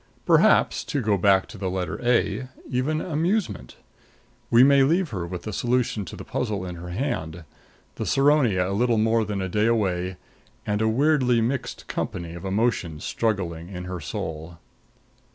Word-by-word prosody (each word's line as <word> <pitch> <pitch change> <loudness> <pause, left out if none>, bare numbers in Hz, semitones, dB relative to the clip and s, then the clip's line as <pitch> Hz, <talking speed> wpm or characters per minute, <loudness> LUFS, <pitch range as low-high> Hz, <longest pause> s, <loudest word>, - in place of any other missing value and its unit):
Perhaps, - - +4
to 145 - -2
go 110 -4 +2
back 95 0 +3
to 110 - -12
the 95 -1 -2
letter 90 -2 -3
a, 125 +1 +1 0.2
even 145 +5 -1
amusement. 170 - -1 0.7
We 120 +1 +7
may 140 0 +6
leave 165 +5 +2
her 90 -5 -3
with 90 0 -6
the 110 - -5
solution 120 -3 0
to 80 - -8
the - - -8
puzzle 105 -6 -2
in 90 -1 -6
her 90 +1 -8
hand, 90 - -3 0.5
the - - -3
Saronia 135 -10 +3
a 100 - -2
little 115 +2 +2
more 110 +1 +2
than 100 -2 -3
a - - -2
day 105 +4 +1
away, 95 -5 0 0.5
and 105 0 -1
a 110 - +2
weirdly 130 -1 +3
mixed 125 +4 -2
company 85 -2 -4
of 85 +2 -8
emotions 95 -6 -1
struggling 90 -7 -2
in 90 -2 -6
her 90 0 -5
soul. 80 +2 -6
105 Hz, 170 wpm, -24 LUFS, 90-125 Hz, 0.7 s, We